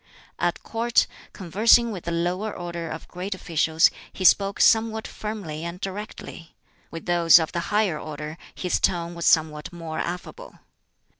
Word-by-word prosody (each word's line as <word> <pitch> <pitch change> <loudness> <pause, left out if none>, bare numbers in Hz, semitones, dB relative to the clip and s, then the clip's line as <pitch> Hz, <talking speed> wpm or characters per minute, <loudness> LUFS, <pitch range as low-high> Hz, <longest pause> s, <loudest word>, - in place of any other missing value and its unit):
At - - -1
Court, 230 +1 +1 0.3
conversing 220 +5 +3
with 185 -5 -7
the 170 - -2
lower 180 +5 -1
order 170 -2 -6
of 160 - -7
great 185 +2 -5
officials, 165 -2 +2 0.2
he 185 - -5
spoke 195 +2 +4
somewhat 220 0 +3
firmly 200 -8 -6
and 170 +1 -6
directly; 195 -4 -7 0.3
with 165 - -8
those 170 -2 +6
of 160 -2 0
the 175 - -2
higher 205 -7 +1
order 155 +2 -7 0.2
his 180 - -1
tone 175 -2 0
was 170 0 -2
somewhat 155 0 +2
more 165 -2 -6
affable. 180 - -6
175 Hz, 150 wpm, -24 LUFS, 165-205 Hz, 0.3 s, those